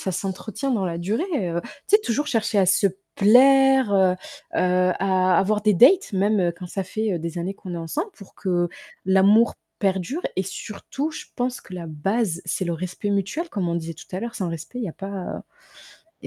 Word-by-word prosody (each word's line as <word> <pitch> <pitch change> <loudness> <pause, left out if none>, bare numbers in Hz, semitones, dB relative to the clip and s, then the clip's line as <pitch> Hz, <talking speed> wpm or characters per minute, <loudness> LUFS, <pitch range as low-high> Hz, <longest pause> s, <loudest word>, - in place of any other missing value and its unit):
ça 190 - -2
s'entretient 195 +7 -3
dans 200 -6 +1
la 170 -1 -3
durée, 210 - -1 0.3
heu, 170 +1 -1 0.3
tu 420 - +6
sais, - - -5
toujours 290 +6 -1
chercher 225 -3 0
à 190 - +5
se 190 +2 +4 0.3
plaire, 265 +2 +6
heu 190 -2 +5 0.4
heu, 180 0 +3
à 185 -2 +3
avoir 210 +2 +2
des 210 -1 +3
dates 275 - +5
même, 205 +1 +2
heu, 175 -1 +1
quand 180 - -7
ça 195 +2 -3
fait, 215 +3 -2
heu, 170 - -1
des 170 +1 -5
années 175 +3 -2
qu'on 185 -2 -8
est - - -4
ensemble, 295 - -3
pour 200 - -14
que 175 -3 0 0.4
l'amour 195 +4 +5 0.3
perdure 195 - -1
et 190 - 0
surtout 250 - -5
je - - -8
pense 250 0 -2
que 185 - -11
la 175 -2 -6
base, 175 +4 -1
c'est 185 +2 -1
le 170 - -1
respect 185 +4 -4
mutuel 200 - -1
comme 185 -5 -2
on 170 - -1
disait 165 0 -4
tout 160 - -13
à - - -2
l'heure, 235 +2 -5
sans 185 -5 -2
respect 165 +8 -6
il 240 - -2
y - - -4
a - - -6
pas, 195 - -8
heu, 195 -3 -5 0.8
il - - -12
195 Hz, 220 wpm, -23 LUFS, 180-225 Hz, 0.8 s, tu